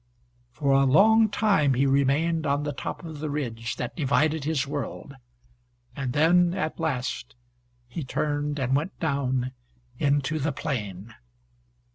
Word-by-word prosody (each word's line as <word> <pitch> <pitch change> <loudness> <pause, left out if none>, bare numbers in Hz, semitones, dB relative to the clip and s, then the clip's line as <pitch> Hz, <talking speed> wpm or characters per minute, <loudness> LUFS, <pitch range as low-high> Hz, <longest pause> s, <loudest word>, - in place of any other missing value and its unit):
For 140 +2 -1
a 135 0 +5
long 215 +10 +5
time 195 - +2
he 135 +3 +2
remained 140 +4 +2
on 140 +1 +1
the 145 -1 -3
top 155 - -6
of 155 -3 -7
the 155 0 -3
ridge 115 -6 -3
that 125 +2 -5
divided 145 0 +1
his 150 -3 0
world. 140 0 -5 0.8
And 130 -3 -3
then, 175 +4 +4
at 185 -4 -3
last, 130 -5 -3 0.5
he 140 +6 -5
turned 145 +2 -2
and 130 -1 +1
went 155 +7 -2
down 130 -5 -1 0.5
into 145 +1 +1
the 150 +2 0
plain. 110 - -4
145 Hz, 140 wpm, -26 LUFS, 130-160 Hz, 0.8 s, a